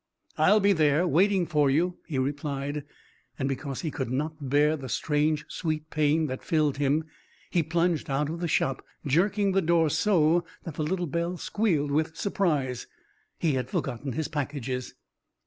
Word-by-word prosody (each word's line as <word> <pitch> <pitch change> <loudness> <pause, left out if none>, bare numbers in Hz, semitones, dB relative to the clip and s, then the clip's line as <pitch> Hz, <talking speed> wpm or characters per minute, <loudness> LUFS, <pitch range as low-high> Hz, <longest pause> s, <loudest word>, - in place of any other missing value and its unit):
"I'll 215 - +5
be 200 0 +4
there, 155 0 +3
waiting 190 +2 +3
for 150 -4 +2
you," 175 +6 +1
he 150 -5 -3
replied, 145 +1 -2 0.5
and 135 - -1
because 135 0 -3
he 160 - -3
could 135 -5 -3
not 150 +2 -3
bear 150 +3 +4
the 135 -4 -7
strange 150 +3 0
sweet 155 -2 -3
pain 155 +1 +2
that 130 -3 -4
filled 150 -3 +1
him 145 +2 +2 0.5
he 175 - +3
plunged 165 0 0
out 140 +2 0
of 165 +2 -4
the 175 - -1
shop, 135 -4 0 0.2
jerking 195 +7 +2
the 195 +1 +2
door 165 -2 +3
so 175 -3 +3 0.2
that 165 - -6
the 155 - -3
little 175 +3 -1
bell 170 +3 -2
squealed 165 -9 0
with 160 +2 0
surprise. 150 - -1 0.5
He 160 -4 +1
had 130 -1 -2
forgotten 130 0 -3
his 160 +4 -2
packages. 135 -4 -4
155 Hz, 165 wpm, -27 LUFS, 140-170 Hz, 0.5 s, I'll